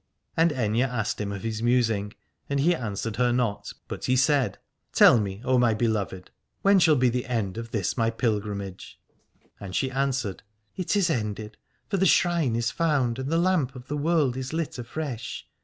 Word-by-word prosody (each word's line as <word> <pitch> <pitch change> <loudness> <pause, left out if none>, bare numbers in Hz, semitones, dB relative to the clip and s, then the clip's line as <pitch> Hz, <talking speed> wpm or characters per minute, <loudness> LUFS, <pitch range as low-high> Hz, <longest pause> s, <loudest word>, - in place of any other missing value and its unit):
And 165 +1 +4
Aithne 115 -4 0
asked 125 -6 -1
him 100 -1 -3
of 100 -1 -6
his 110 -1 -3
musing, 115 -4 +1 0.4
and 140 0 0
he 170 +6 +4
answered 110 - -4
her 125 0 +3
not, 120 -4 -1 0.2
but - - -5
he 130 - +2
said: 135 -5 +2 0.3
Tell 120 - +7
me, 100 +1 -4
O 130 -1 +3
my 120 -3 +3
beloved, 105 -5 -2 0.3
when 200 0 +6
shall 160 -3 +5
be 130 -2 +3
the 125 +2 -2
end 110 -7 -1
of 115 0 -6
this 105 -6 -1
my 115 -1 +1
pilgrimage? 105 -4 -3 0.6
And 95 -3 -7
she 130 - 0
answered: 135 -7 -1 0.3
It 185 +2 -1
is 185 -4 +2
ended, 105 -4 -3 0.3
for 200 - -1
the 190 +1 +3
shrine 170 -9 +3
is 115 -1 0
found, 140 -7 0
and 130 +1 -3
the 165 - +2
lamp 170 -7 +1
of 125 0 -11
the 150 - -2
world 150 -4 +1
is 130 +2 -5
lit 160 -5 -3
afresh. 120 -1 -5
125 Hz, 190 wpm, -26 LUFS, 110-140 Hz, 0.6 s, Tell